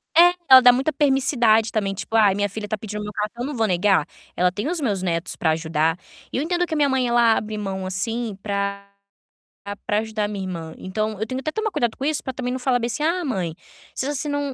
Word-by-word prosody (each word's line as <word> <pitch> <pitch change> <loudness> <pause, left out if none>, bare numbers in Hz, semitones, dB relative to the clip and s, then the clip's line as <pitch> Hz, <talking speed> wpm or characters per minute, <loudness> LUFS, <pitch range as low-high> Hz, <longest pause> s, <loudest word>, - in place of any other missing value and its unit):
É, 350 +1 +7
ela 260 -1 +10
dá 245 -1 +8
muita 270 +5 0
permissividade 255 -6 +3
também, 200 -3 -1
tipo: 215 +3 -6
"Ai, 205 -3 +5
minha 205 0 0
filha 210 +2 -6
está 215 +1 -3
pedindo 210 0 -6
meu 210 - -5
cartão, 215 +4 -4
eu - - -2
não 295 - -5
vou 225 - +2
negar. 185 -3 +2 0.3
Ela 180 0 +2
tem 205 +9 -4
os 345 -1 0
meus 205 -9 -1
netos 170 -2 -1
pra 160 - +1
ajudar", 160 0 0 0.3
e - - -2
eu 280 - 0
entendo 350 +1 0
que - - -4
a - - 0
minha 290 -1 +3
mãe, 260 -2 +1
ela 235 -1 +4
abre 215 0 -3
mão, 190 -2 -4
assim, 220 +3 -2
pra 200 -1 -3 1.0
pra 210 - +1
ajudar 220 -1 -2
a 205 - -1
minha 200 -2 -4
irmã, 165 -3 -6
então 215 +2 -3
eu - - +1
tenho 255 +4 -4
que 290 - -6
até - - -1
tomar 435 +2 -1
cuidado 235 -9 -1
com 270 - -5
isso 300 0 0
pra 260 - -3
também 250 -1 -3
não 255 - -2
falar 250 -1 +1
bem 235 - -1
assim: 245 +5 -3
"Ah, 350 +2 0
mãe, 185 - -2 0.4
seja 270 +2 -2
assim 295 +2 -2
não, 285 0 -1
220 Hz, 255 wpm, -22 LUFS, 195-265 Hz, 1.0 s, ela